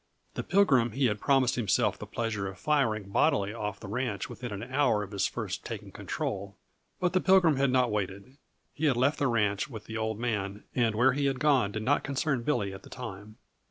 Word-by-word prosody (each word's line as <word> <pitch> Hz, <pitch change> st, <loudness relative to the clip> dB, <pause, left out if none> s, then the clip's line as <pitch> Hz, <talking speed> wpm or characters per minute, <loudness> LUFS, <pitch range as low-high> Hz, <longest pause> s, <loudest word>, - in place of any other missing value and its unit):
The -, -, -3 dB
Pilgrim 135 Hz, -, +3 dB
he 135 Hz, 0 st, +1 dB
had 105 Hz, -3 st, +1 dB
promised 135 Hz, -3 st, +3 dB
himself 110 Hz, -6 st, +1 dB
the -, -, -7 dB
pleasure 110 Hz, -4 st, -2 dB
of 95 Hz, -1 st, -7 dB
firing 110 Hz, -8 st, 0 dB
bodily 100 Hz, +1 st, +2 dB
off 105 Hz, -2 st, -4 dB
the -, -, -9 dB
ranch 110 Hz, -3 st, -3 dB
within 120 Hz, -1 st, -6 dB
an 100 Hz, +1 st, -5 dB
hour 125 Hz, -4 st, +1 dB
of 100 Hz, -, -9 dB
his 100 Hz, -2 st, +1 dB
first -, -, -5 dB
taking -, -, -7 dB
control 100 Hz, 0 st, -4 dB, 0.4 s
but 180 Hz, 0 st, +1 dB
the 185 Hz, -, +3 dB
Pilgrim 185 Hz, -6 st, +5 dB
had 135 Hz, 0 st, +3 dB
not 125 Hz, -2 st, +2 dB
waited. 100 Hz, +5 st, -4 dB, 0.4 s
He 155 Hz, -, -2 dB
had 135 Hz, -5 st, +3 dB
left 140 Hz, +4 st, +2 dB
the 140 Hz, -, +2 dB
ranch 105 Hz, -2 st, +1 dB
with 110 Hz, -5 st, -8 dB
the 110 Hz, -, -5 dB
Old 110 Hz, -1 st, -2 dB
Man 105 Hz, -4 st, -2 dB
and 115 Hz, -3 st, +1 dB
where 125 Hz, +4 st, +4 dB
he 140 Hz, +1 st, +1 dB
had 135 Hz, -2 st, -1 dB
gone 130 Hz, -8 st, +3 dB
did 110 Hz, +1 st, -4 dB
not 145 Hz, +5 st, +2 dB
concern 140 Hz, -1 st, -1 dB
Billy 115 Hz, -7 st, -1 dB
at 95 Hz, -, -9 dB
the -, -, -14 dB
time. 110 Hz, -3 st, -8 dB
115 Hz, 215 wpm, -29 LUFS, 105-135 Hz, 0.4 s, Pilgrim